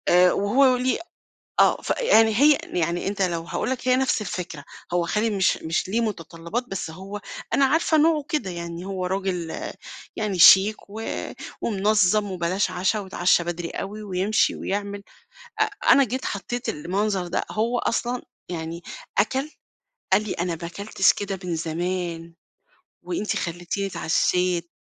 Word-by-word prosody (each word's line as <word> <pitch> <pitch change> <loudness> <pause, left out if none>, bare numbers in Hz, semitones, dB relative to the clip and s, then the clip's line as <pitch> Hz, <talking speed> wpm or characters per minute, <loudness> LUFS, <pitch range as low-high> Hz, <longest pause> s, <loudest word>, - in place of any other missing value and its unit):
آآ 180 0 +6
وهو 255 +6 +4
ليه 255 +1 0 0.6
آه. - - +4
ف - - -7
يعني 225 - +5
هي 290 +5 +6
يعني 170 +1 -1
أنت 200 0 -2
لو 170 -3 0
هاقول 170 - -3
لك 255 -1 -3
هي 255 - +5
نفس 260 -3 +1
الفكرة، 180 -8 -5 0.3
هو 175 -1 +2
خالي 210 +6 0
مش 195 -3 +2
مش 160 +2 -2
ليه 225 +4 +1
متطلّبات 170 0 -3
بس 190 -4 -4
هو 195 +5 -8 0.3
أنا 275 - +5
عارفة 315 +3 +2
نوعه 310 -1 +3
كده. 295 -11 -1
يعني 170 0 -6
هو 190 -2 -3
راجل 185 -3 -2 0.6
يعني 205 -4 -2
شيك، 195 +4 +8
و 215 +2 -7 0.6
ومنظّم 205 -1 +2
وبلاش 185 +2 0
عشا 185 +4 0
ويتعشّى 185 -3 +2
بدري 170 0 -4
أوي 210 +2 -6
ويمشي 195 +2 +1
ويعمل، 200 0 -3 0.6
أ - - +6 0.3
أنا 275 - +7
جيت 260 +1 -3
حطّيت 240 +5 -3
المنظر 190 +4 -1
ده 175 - -1
هو 235 +3 0
أصلًا 240 +2 -1 0.3
يعني 165 -1 -5 0.4
أكَل 265 +8 +1 0.6
قال 195 +2 +5
لي: 215 - -3
"أنا 170 -1 -2
ما 170 - -3
كلتش 190 +1 +2
كده 200 -1 -4
من 175 -2 -2
زمان، 170 0 -3 0.7
وأنت 275 -12 -2
خلّيتيني 175 +3 -3
اتعشّيت." 180 0 +1
195 Hz, 150 wpm, -24 LUFS, 175-215 Hz, 0.7 s, شيك